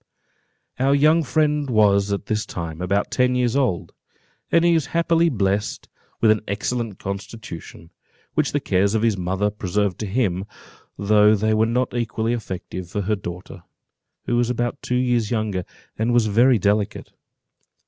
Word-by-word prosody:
Our 135 +2 +3
young 155 +4 +4
friend 150 -1 0
was, 100 -3 +3
at 100 - -2
this 110 0 -1
time, 85 -1 -6
about 100 +3 0
ten 125 0 +2
years 125 -1 +1
old, 95 -11 0 0.6
and 170 0 +4
was 160 -4 +1
happily 170 0 +3
blest 100 -4 -1 0.3
with 110 - +5
an 110 - +1
excellent 110 +1 -3
constitution, 100 -4 -8 0.4
which 150 -2 +1
the 145 - 0
cares 100 -3 +1
of 110 - +1
his 115 -3 +3
mother 95 +3 -1
preserved 100 -1 -1
to 110 - -3
him, 95 -4 0 0.5
though 105 +1 +4
they 110 +1 +1
were 110 +1 +3
not 125 +2 0
equally 115 -1 -1
effective 95 -5 -6
for 105 - -2
her 105 +2 0
daughter, 90 -1 -8 0.6
who 120 - 0
was 120 0 +1
about 120 +3 -2
two 125 - -2
years 120 -3 +1
younger, 105 -6 -1 0.3
and 115 +2 +1
was 120 -2 +4
very 120 +4 +4
delicate. 100 +1 -1
110 Hz, 160 wpm, -22 LUFS, 100-125 Hz, 0.6 s, with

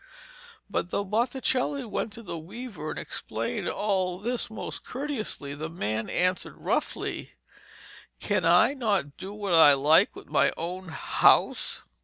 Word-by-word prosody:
But 200 -3 -2
though 200 - -1
Botticelli 255 +5 0
went 220 0 -3
to 230 +1 -10
the 175 - -6
weaver 210 +9 -7
and - - -5
explained - - -3
all 190 -3 0
this 235 +5 -2
most 220 - -6
courteously, 250 - -4
the 155 +3 -5
man 110 -9 -3
answered 180 +1 0
roughly, - - -2 0.9
'Can 205 -3 0
I 175 +10 +5
not 205 - 0
do 190 +2 -7
what 205 -3 -3
I 160 -3 +9
like 145 +4 +4
with - - -10
my - - +2
own 180 +3 -4
house?' 160 - +3
190 Hz, 140 wpm, -27 LUFS, 165-230 Hz, 0.9 s, I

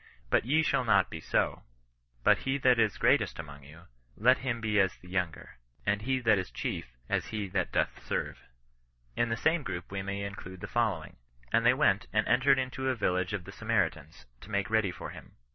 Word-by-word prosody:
But - - +3
ye 155 +5 +3
shall 130 - +1
not 100 -6 +3
be 80 - -5
so: - - 0 0.6
but - - +5
he 135 +1 -1
that 125 -3 +4
is 110 -2 +2
greatest - - +2
among 75 -3 -9
you, 75 +4 -14 0.4
let 125 +4 +4
him 125 -3 -2
be 105 -2 +1
as 95 -1 +2
the 90 - -17
younger; 90 -8 -3 0.3
and 105 -1 +1
he 130 +4 0
that 110 -4 +4
is 95 - -4
chief, - - -5
as - - -1
he 105 -2 -3
that 90 -1 -1
doth - - 0
serve." - - -3 0.8
In 120 - +1
the 115 - -1
same 160 +6 +2
group 90 -9 -6
we 100 0 -3
may 100 +1 -4
include 95 -2 -7
the - - -4
following: 115 -4 -1 0.2
" - - -23
And 115 - +4
they 125 - +6
went, 110 -8 +2
and 110 0 +1
entered 135 +2 +4
into 130 0 -2
a 130 - +1
village 90 -4 0
ef 100 -3 -3
the 95 - -10
S«naritans, 85 - -2
to 100 - -13
make 100 +1 -1
ready 110 -3 +3
for 90 - -7
him. - - -12
105 Hz, 210 wpm, -30 LUFS, 90-120 Hz, 0.8 s, they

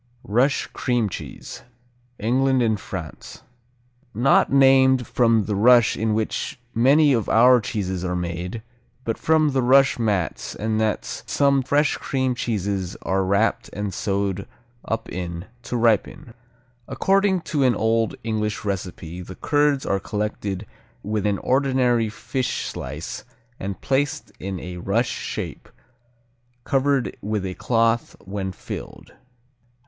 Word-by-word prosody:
Rush 125 +7 +2
Cream 120 -5 0
Cheese - - -8 0.6
England 130 +3 +2
and 110 -3 +1
France 85 -7 -8 0.7
Not 125 +5 +4
named 130 -2 +5
from 115 -3 +3
the 105 - -2
rush 120 +3 +5
in 110 0 0
which 110 +5 -2
many 140 +5 +5
of 115 -4 0
our 125 +2 +6
cheeses 95 -4 -3
are 90 -1 -1
made, 90 +5 -4 0.4
but 115 - -1
from 155 -2 +3
the 135 -1 +1
rush 135 +1 +4
mats 105 -7 -1
and 110 0 -1
nets 110 -1 -1
some 140 -1 +3
fresh 145 +3 +1
cream 130 -2 -1
cheeses 100 -6 -2
are 95 0 +1
wrapped 100 +4 +1
and 100 -1 -3
sewed 100 -2 -2 0.4
up 115 0 -3
in 85 0 -5 0.2
to 120 - -3
ripen. 115 0 +1 0.5
According 195 -1 +2
to 150 -3 -2
an 125 -3 +4
old 115 +1 +1
English 110 -2 -2
recipe 90 -3 -4
the 90 +1 -9
curds 145 - +1
are 100 - 0
collected 105 -1 -3 0.4
with 105 0 -1
an 100 -1 +1
ordinary 130 -3 +2
fish 130 +3 -3
slice 75 +5 -6 0.4
and 95 0 -5
placed 140 +1 -1
in 95 -1 -4
a 90 +1 -7
rush 100 +7 0
shape, - - -5 0.9
covered 135 -1 +1
with 105 -1 -2
a 95 - -3
cloth 115 +2 +1
when 95 -1 -4
filled. 90 - -9
110 Hz, 130 wpm, -23 LUFS, 100-130 Hz, 0.9 s, our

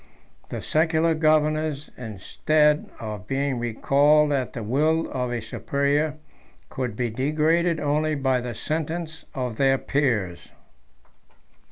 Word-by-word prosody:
The - - -5
secular 160 +1 +2
governors, 155 -1 +1
instead 150 - +1
of 105 -4 -6
being 135 -2 -1
recalled 145 +6 +3
at 135 -3 -1
the 115 - -5
will 155 +8 +1
of 125 -1 -2
a 120 -1 -2
superior, 140 +6 0 0.5
could 125 -5 -4
be 120 0 -2
degraded 155 +6 +1
only 150 +1 0
by 130 -3 +1
the 120 -1 -5
sentence 160 +1 -4
of 125 -4 -3
their 135 -1 +3
peers. 120 -12 -1
145 Hz, 120 wpm, -24 LUFS, 125-155 Hz, 0.5 s, recalled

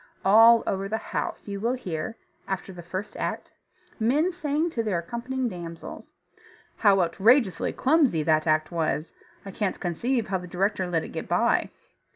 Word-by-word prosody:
All 225 +3 +7
over 195 0 -2
the 220 - 0 0.2
house - - -3
you 200 -1 -4
will 235 +4 0
hear 185 -2 -5 0.3
(after 195 0 -4
the 175 - -9
first 185 +4 -6
act) - - -4 0.5
men 285 +11 +2
saying 320 -1 -1
to 235 - -1
their 210 -5 -1
accompanying 240 +8 -3
damsels, 170 -5 -8 0.7
"How 200 -3 +4
outrageously 195 +3 +3
clumsy 265 - +2
that 155 0 +2
act 155 +1 +2
was. 160 -1 -2 0.3
I 195 - -6
can't 195 -1 -2
conceive 225 +7 -1
how 190 -1 0
the 180 - -9
director 190 +1 -1
let 165 -2 0
it - - -7
get - - -6
by." - - +2
195 Hz, 165 wpm, -26 LUFS, 175-235 Hz, 0.7 s, All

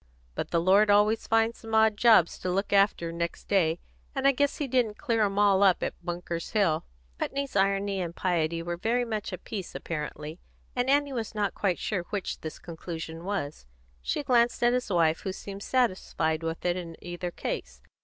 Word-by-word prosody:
But - - -4
the 170 - +2
Lord 195 +5 +5
always 210 +2 +3
finds 225 +1 +2
some 225 -1 -4
odd 220 -1 +5
jobs 215 -6 +5
to 185 - -3
look 195 +3 -1
after 195 -4 +3
next 170 0 -4
day, 170 -5 +2 0.4
and 270 0 +2
I - - +7
guess 285 +1 0
He 290 - -2
didn't 240 -4 +1
clear 230 -6 0
'em 200 -1 +1
all 200 -2 +4
up 190 -3 +4
at - - -1
Bunker's 175 -1 -4
Hill." 190 -8 +2 0.3
Putney's 275 -3 -3
irony 195 0 +1
and 170 -1 -4
piety 165 -2 0
were 175 0 -3
very 240 +6 +1
much 215 -3 -3
of 185 - -6
a - - -38
piece 195 -5 -6
apparently, 150 0 -5 0.4
and 250 +1 0
Annie 285 0 +3
was 225 -3 -4
not 205 -2 0
quite 190 -4 0
sure 200 -4 -2
which 205 -2 -3
this 155 - -6
conclusion 165 0 -7
was. 155 - -4 0.3
She - - -2
glanced 240 -2 +2
at 240 0 +5
his 250 -2 -1
wife, 165 -3 +3
who 190 - -4
seemed 195 +1 -8
satisfied 185 -10 0
with 165 +1 -4
it 175 0 +2
in 170 -2 -6
either 175 0 -5
case. 65 - -5
195 Hz, 195 wpm, -28 LUFS, 170-225 Hz, 0.4 s, I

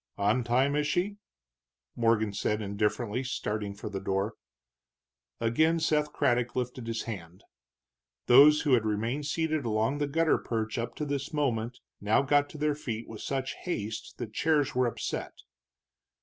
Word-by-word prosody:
"On 105 +5 +2
time, 130 +4 +2
is 150 0 +1
she?" 200 +6 0 0.8
Morgan 115 -3 +2
said 105 +1 0
indifferently, 105 +3 -1
starting 105 -5 -3
for 105 - -7
the 100 -2 -4
door. 95 +2 -1 1.1
Again 155 +9 +2
Seth 150 -2 +1
Craddock 125 -4 +1
lifted 125 -1 -3
his 115 -1 -2
hand. 90 -5 -8 0.8
Those 145 +4 +8
who 145 -4 +2
had 120 -3 +4
remained 115 +7 -1
seated 155 -1 0
along 115 +5 0
the 145 - 0
gutter 160 +2 +2
perch 110 0 -2
up 115 0 -4
to 150 - -3
this 140 +1 -3
moment 125 -5 -1 0.2
now 105 +6 +3
got 145 +1 +3
to - - -10
their 150 0 +1
feet 120 -6 -5
with 110 - -8
such 135 -1 -2
haste 110 - -5
that 115 -4 -6
chairs 150 -1 +2
were 125 -1 +2
upset. 115 - -4
120 Hz, 155 wpm, -29 LUFS, 110-145 Hz, 1.1 s, Those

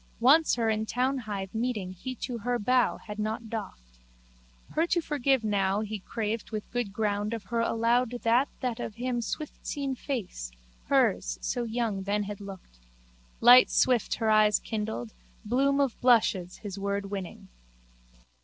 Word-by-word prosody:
Once 290 +7 +5
her 230 -2 0
in 220 0 +1
townhithe 220 -5 -2
meeting 220 -5 -2
he 255 +8 -6
to 240 0 -5
her 245 +3 0
bow 250 +3 +2
had 210 0 -9
not 220 +1 -3
doffed. - - -7 0.7
Her 325 +2 +1
to 345 - +2
forgive 275 -5 +1
now 200 -1 +1
he 215 -1 -4
craved 220 +2 -3
with 215 -2 -6
good 245 -4 -2
ground 210 +1 -1
of 225 - -7
her 230 +4 -2
allowed 230 +2 +2
that 240 +5 +3
that 250 -3 -2
of 210 - -5
him 245 0 -2
swiftseen 280 +2 -4
face, 215 - -4 0.4
hers, - - +2
so 235 - -2
young 225 -3 -1
then 205 +2 0
had 205 0 -6
looked. 190 - -11 0.6
Light 245 +2 +9
swift 250 -3 +2
her 220 -2 +1
eyes 215 -1 +5
kindled, 210 - -4 0.3
bloom 275 +5 +2
of 275 -4 0
blushes 210 -7 +3
his 200 -1 -5
word 200 0 -2
winning. 195 -3 -6
220 Hz, 155 wpm, -28 LUFS, 205-245 Hz, 0.7 s, Light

